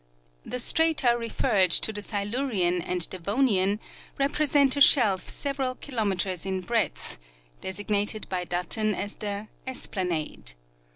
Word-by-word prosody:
' - - -38
The - - 0
strata 300 -2 +3
referred 215 -5 +1
to 220 +6 +3
the 205 - -3
Silurian 205 -4 0
and 180 0 0
Devonian 200 +1 +1 0.4
represent 280 -1 +3
a 285 - -2
shelf 215 -10 +5
several 270 -2 -3
kilometers 200 - -2
in 190 -1 -3
breadth, 230 - -2 0.4
designated 205 +2 -2
by 180 -1 -3
Button 185 +5 -1
as 205 +2 -4
the 205 0 -4
" - - -30
esplanade." 175 - -3
205 Hz, 125 wpm, -26 LUFS, 185-250 Hz, 0.4 s, shelf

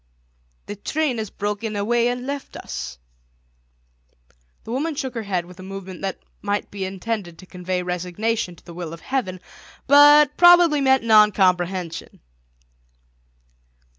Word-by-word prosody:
"The 205 - -6
train 275 +3 -2
has 215 -2 -4
broken 210 +1 -4
away 235 +4 +1
and 245 +1 -3
left 280 0 -6
us!" 60 0 -7 1.7
The 225 - -8
woman 295 +5 -2
shook 265 -2 -4
her 230 - -4
head 185 -5 -2
with 180 +1 -15
a - - -8
movement 190 -1 -8
that 195 -1 -3 0.2
might 205 0 -2
be 195 -1 -4
intended 190 -2 -5
to 185 - -13
convey 180 0 -4
resignation 180 +3 -2
to - - -22
the 170 - -11
will 170 -2 -6
of 165 - -10
heaven, 230 -9 -3 0.5
but 290 +1 +7
probably 350 -4 +6
meant 265 -2 +3
noncomprehension. 190 -5 +2
205 Hz, 135 wpm, -22 LUFS, 180-255 Hz, 1.7 s, but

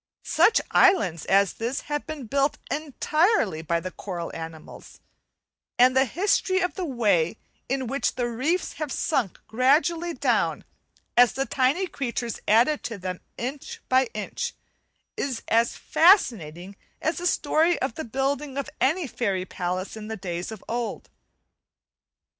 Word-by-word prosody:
Such 455 - +4
islands 195 - +4
as 195 0 +3
this 235 +4 -3
have 295 +1 -4
been 310 -5 -6
build 275 +5 +1
entirely 305 - +1
by 170 +1 0
the 185 +2 -6
coral 175 -4 -6
animals, 160 -1 -9 0.8
and 255 +1 +5
the 265 +1 +5
history 375 - +1
of 360 -1 0
the 370 - -3
way 210 - +1 0.3
in 265 0 -1
which 275 +4 -1
the 245 -1 -1
reefs 280 +10 -1
have 300 -3 -2
sunk 260 - -1
gradually 320 +8 +2
down, - - +1 0.5
as 245 -1 +6
the 270 - -1
tiny 275 +10 +1
creatures 240 - -4
added 240 +8 +4
to 225 - -4
them 185 -1 -5 0.2
inch 265 +4 -5
by 260 +1 +4
inch, 350 - -4 0.6
is 260 -4 -3
as 230 +1 +2
fascinating 200 - +3 0.2
as 315 +2 -1
the 355 - 0
story 320 +2 +2
of 265 - -1
the 315 - -5
building 270 +3 -2
of 280 +2 -3
any 320 +6 +2
fairy 200 -8 -2
palace 185 +2 -4
in 215 -1 -8
the 220 0 -5
days 175 0 -4
of 220 -3 -9
old. 235 0 -4
255 Hz, 145 wpm, -25 LUFS, 205-300 Hz, 0.8 s, as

